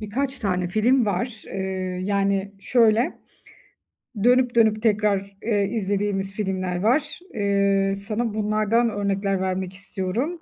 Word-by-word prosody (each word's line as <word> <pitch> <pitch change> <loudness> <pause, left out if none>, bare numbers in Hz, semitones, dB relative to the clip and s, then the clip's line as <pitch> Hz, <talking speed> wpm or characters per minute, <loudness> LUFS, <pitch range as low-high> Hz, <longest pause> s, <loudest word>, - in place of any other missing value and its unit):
birkaç 260 +6 -2
tane 185 -4 -1
film 230 +5 +3
var. 215 +4 -2
Eee, 190 -1 -3
yani 200 0 0
şöyle, 230 0 +2 1.1
dönüp 250 0 +4
dönüp 220 -2 +4
tekrar, 200 -3 +1
eee, 205 -3 +1
izlediğimiz 200 -2 -1
filmler 185 -3 -2
var. 275 - +1
Eee, 200 -1 +1
sana 215 +3 -3
bunlardan 215 +2 +1
örnekler 200 -2 -1
vermek 190 0 -2
istiyorum. 200 - -3
205 Hz, 115 wpm, -23 LUFS, 195-225 Hz, 1.1 s, dönüp